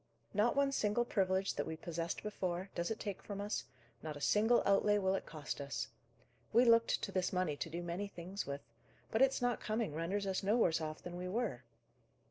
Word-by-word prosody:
Not 215 +5 +3
one 280 0 +3
single 240 -2 +1
privilege 190 -3 +1
that - - -2
we 160 0 -4
possessed 165 0 -3
before, 190 -3 -3
does 170 0 -1
it 220 - -2
take 200 -3 -4
from 200 -1 -6
us; 205 +1 -2 0.4
not 155 -2 -5
a - - -8
single 220 +10 +4
outlay 205 +1 +4
will 190 -1 +2
it 195 - -2
cost 150 -2 -5
us. 120 -5 -3 0.6
We 240 +3 +6
looked 230 -1 +5
to - - -2
this 185 -1 0
money 180 -5 0
to 165 - -3
do 170 +2 -4
many 175 +4 -3
things 190 +1 -6
with; 140 0 -4 0.5
but 220 - +2
its 270 -1 +4
not 245 -2 +2
coming 215 -6 -1
renders 180 +6 -1
us 190 -1 0
no 210 +4 +3
worse 165 -8 +3
off 155 0 -5
than 175 0 -6
we 180 +1 -4
were. 210 - -1
195 Hz, 210 wpm, -36 LUFS, 170-215 Hz, 0.6 s, We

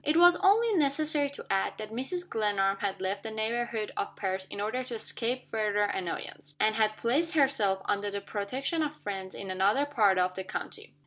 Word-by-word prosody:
It 300 +2 +2
was 350 +1 +8
only 425 +4 +4
necessary 295 -2 +2
to 280 - -9
add, 195 0 0
that 215 0 -7
Mrs. 350 +10 -3
Glenarm 200 -3 +1
had 200 -2 -2
left 190 +1 -2
the 220 - -5
neighborhood 220 0 -2
of - - -3
Perth, 190 -1 -3
in - - -7
order 220 +5 -1
to 250 -2 -6
escape 235 +3 -3
further 210 -2 +1
annoyance; 170 -6 -4
and 215 0 +3
had 215 -1 +1
placed 305 +8 +1
herself 225 -10 +2
under 205 0 0
the 200 0 -3
protection 250 +11 -2
of 300 -1 -1
friends 195 -5 -5
in 195 -1 -5
another 200 +9 +2
part 215 -10 +3
of 180 0 +2
the 190 - -5
county. 185 - -7
220 Hz, 195 wpm, -29 LUFS, 200-275 Hz, -, was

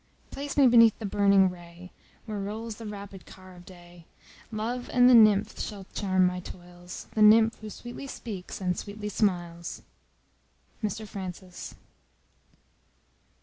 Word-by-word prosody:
Place 285 +1 -6
me 280 - +6
beneath 230 -3 +6
the 220 - -6
burning 200 -1 +4
ray, 175 0 -13 0.3
Where 215 -2 -5
rolls 215 +2 -5
the 225 - -8
rapid 200 -2 -9
car 185 -1 -14
of 175 0 -15
day; 175 -2 -15 0.4
Love 235 +3 -4
and 245 0 +5
the 255 - +7
nymph 215 -2 +5
shall 200 -3 -6
charm 185 -2 +2
my 180 0 0
toils, 175 0 -10
The 215 - -1
nymph 220 +2 +6
who 215 - -7
sweetly 240 +5 -9
speaks, 200 -8 -7
and 180 -2 -1
sweetly 210 +2 -6
smiles. 175 -5 -2 1.0
MR 215 +1 -3
FRANCIS. 185 -2 -8
200 Hz, 140 wpm, -27 LUFS, 180-220 Hz, 1.0 s, the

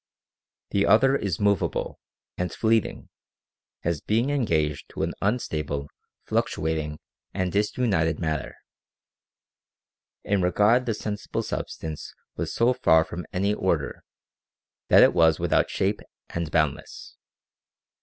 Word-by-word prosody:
The 100 0 +2
other 135 +5 +5
is 100 -10 -2
movable 100 -1 0 0.4
and 90 0 -2
fleeting, 110 -1 0 0.7
as 85 -3 -1
being 115 +6 +1
engaged 80 - 0
to - - -4
an - - -1
unstable, 75 - -2 0.4
fluctuating, 75 -1 -1 0.4
and 95 -2 -1
disunited 100 -6 +1
matter. 80 -3 -3 1.7
In 100 -1 +1
regard 105 +7 +3
the 115 - 0
sensible 105 -1 -4
substance 80 -2 -5 0.2
was - - -3
so 120 +2 +3
far 80 -9 +4
from 85 +1 -7
any 100 +3 +1
order, - - -1 0.8
that - - +7
it - - +5
was 80 -1 +4
without 85 0 +1
shape 100 +2 0 0.3
and 85 -2 -3
boundless. 75 -3 -2
90 Hz, 115 wpm, -25 LUFS, 80-105 Hz, 1.7 s, that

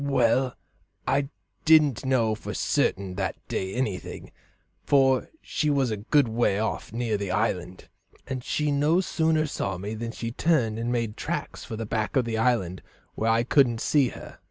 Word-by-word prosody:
"Well, 130 -2 +2 0.5
I 140 0 +1 0.3
didn't 155 -6 +5
know 120 -4 +2
for 110 - -6
certain 95 -1 0
that 95 -3 -1
day 95 0 -3
anything, 110 -7 -4 0.5
for 135 -2 +3
she 150 - -1
was 135 -4 +2
a 110 - -2
good 125 +6 +2
way 110 -3 +1
off, 110 0 -2
near 115 -2 -1
the 100 -1 -4
island, 90 0 -2 0.4
and 130 -1 -4
she 150 +2 0
no 150 +5 +3
sooner 160 -4 +1
saw 100 -10 -3
me 100 +4 -5
than 115 +1 -4
she 115 0 -5
turned 120 -6 +1
and 120 +1 -1
made 115 -3 -1
tracks - - -4
for 110 - -6
the 115 +1 -4
back 110 +2 -2
of 130 -3 +3
the 110 -1 -2
island 105 -7 +1 0.3
where 110 - -1
I 115 +1 +3
couldn't 125 -2 +3
see 140 +2 +3
her. - - -10
120 Hz, 175 wpm, -26 LUFS, 110-135 Hz, 0.5 s, didn't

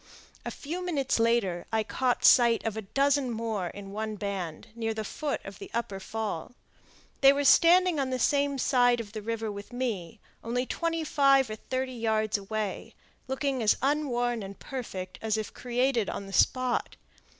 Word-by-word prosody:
A - - -4
few 340 +6 -5
minutes 285 -9 0
later 225 -7 +1
I 220 -1 +1
caught 250 +3 0
sight 235 -2 +6
of 220 -2 -1
a 220 - -3
dozen 275 +5 +1
more 220 -5 -2
in 195 +2 -9
one 215 +1 -3
band, 195 -4 -5
near 225 -1 -2
the 220 - -3
foot 290 +7 -3
of 195 -1 -9
the - - -9
upper 205 -4 -2
fall. 215 -1 -4 0.7
They 275 0 +8
were 285 +1 0
standing 345 +3 +5
on 270 -1 0
the 255 - -1
same 280 +2 +1
side 245 -2 +3
of 215 -3 -6
the 215 0 -6
river 225 0 -3
with 200 +2 -9
me, 225 -6 -3 0.2
only 245 +2 -1
twenty 330 +3 -2
five 275 -5 +3
or - - -3
thirty 255 +3 -3
yards 220 -2 0
away, 210 0 -4 0.3
looking 265 -1 -1
as 215 - +3
unworn 245 -5 0
and 195 0 -8
perfect 190 -9 -6
as 220 -1 0
if 215 - -4
created 245 -2 0
on 200 - -5
the 195 - -10
spot. 255 +2 +2
235 Hz, 175 wpm, -28 LUFS, 215-265 Hz, 0.7 s, They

